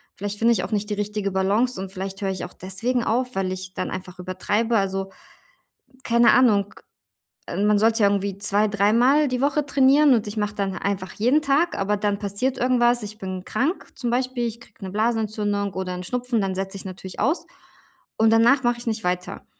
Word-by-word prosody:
Vielleicht 205 +1 -5
finde 230 +1 +4
ich 215 -6 +1
auch 180 - -5
nicht 210 0 -1
die - - -1
richtige 205 -1 -2
Balance 200 +5 +1
und 190 -1 -6
vielleicht 195 +1 -6
höre 195 - -1
ich 190 - -4
auch 180 - -11
deswegen 225 +7 -2
auf, 250 +3 -1
weil 190 -1 -1
ich 185 0 -6
dann - - -3
einfach 180 -1 -7
übertreibe. 205 +5 0
Also, 195 -1 -1 0.9
keine 235 0 +5
Ahnung, 210 -5 +3 0.8
ähm, 205 - -1
man 210 -1 +4
sollte 225 +1 +3
ja 200 - +6
irgendwie 200 -1 -1
2, 205 +1 +1
dreimal 230 +9 +3
die 250 0 -1
Woche 285 +1 +1
trainieren 280 +1 +5
und 225 -3 +1
ich 205 - -6
mache 210 0 -2
dann 195 -2 -2
einfach 190 -1 -3
jeden 250 +8 +2
Tag, 300 +4 +1
aber 200 +1 0
dann 205 0 -1
passiert 215 +6 -2
irgendwas. 240 -1 +2
Ich 210 +1 -7
bin 185 -2 -6
krank 285 - -2
zum 245 - -3
Beispiel, 250 0 -1
ich 230 0 -7
kriege 235 - -16
'ne 190 - -5
Blasenentzündung 210 -2 -1
oder 185 -1 -3
'n 180 0 -6
Schnupfen, 245 +2 -1
dann 190 -1 -2
setze 195 +1 -4
ich 195 - -9
natürlich 190 0 -8
aus. 310 +6 +1 0.7
Und 220 0 +4
danach 235 +5 +4
mache 240 0 +1
ich 240 - -10
nicht 220 -1 -2
weiter. 180 +1 -3
210 Hz, 205 wpm, -23 LUFS, 195-240 Hz, 0.9 s, ja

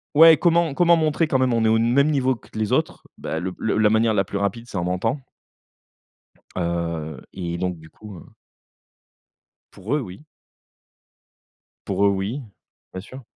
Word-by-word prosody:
ouais, 160 +1 +8
comment 170 -3 +2
comment 170 +2 +4
montrer 155 0 +1
quand 135 - +1
même 130 -2 +2
on 115 -1 +1
est - - +4
au 110 0 +3
même 125 +6 +3
niveau 130 -3 +1
que - - -14
les 110 +1 -1
autres, 155 +5 -1
bah, 80 - -4
le 95 +1 -4
la 110 -1 +2
manière 110 +1 +2
la 100 -2 +2
plus 100 +1 -5
rapide 110 +4 -2
c'est - - -5
en 85 - -1
mentant 105 +10 -1 1.4
heu 85 -4 -3
et 85 -2 -4
donc, 90 -1 -2
du 80 - -15
coup, 105 0 -12
heu - - -14 1.5
Pour 105 +8 -3
eux, - - +1
oui 95 -1 -9 1.7
pour 100 - +1
eux, - - +5
oui. 100 +8 -2 0.5
Bien 95 - -5
sûr. 130 +5 -12
110 Hz, 170 wpm, -22 LUFS, 90-135 Hz, 1.7 s, ouais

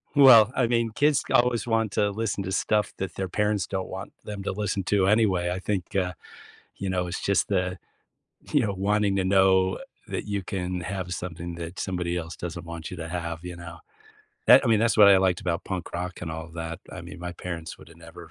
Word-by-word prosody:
Well, 125 -6 +8
I 125 - +2
mean, 115 -1 +1
kids 145 +5 +2
always 120 0 +3
want 115 -3 +1
to 105 -1 +1
listen 105 -2 -2
to 95 - -4
stuff 105 +2 +1
that 95 -3 -4
their 95 - -2
parents 105 +1 0
don't 95 -1 -3
want 95 +1 -7
them 105 -2 -6
to - - -2
listen 100 0 -2
to 95 -1 +2
anyway. 95 -5 +3
I 90 - -2
think, 95 -2 -3
uh, 90 -2 +1 0.6
you 95 - -4
know, 90 -1 -1
it's 90 - -4
just 100 - +1
the, 90 -1 0 0.8
you 145 - +5
know, 105 -3 -1
wanting 100 +1 +1
to 95 - +1
know 95 0 +3 0.3
that - - -4
you 100 -2 -2
can 90 -1 -3
have 90 0 -4
something 85 0 -6
that 85 +2 -7
somebody 90 -2 -2
else 80 -2 -4
doesn't 85 0 -6
want 85 +1 -7
you 90 - -6
to 80 0 -5
have, 85 -1 -4
you 90 -1 -6
know? 85 -1 -10 0.7
That - - +8
I - - +1
mean, 110 -2 +4
that's 115 0 +2
what 105 -2 +8
I 100 - +8
liked 95 -2 +2
about 85 -2 -2
punk 95 -3 -5
rock 90 +1 -4
and 85 - -5
all 80 0 -6
that. 80 -1 -5
I - - -7
mean, - - -10
my 90 +1 -5
parents 85 -2 -6
would've 80 +1 -15
never 85 +1 -13
95 Hz, 220 wpm, -26 LUFS, 85-105 Hz, 0.8 s, Well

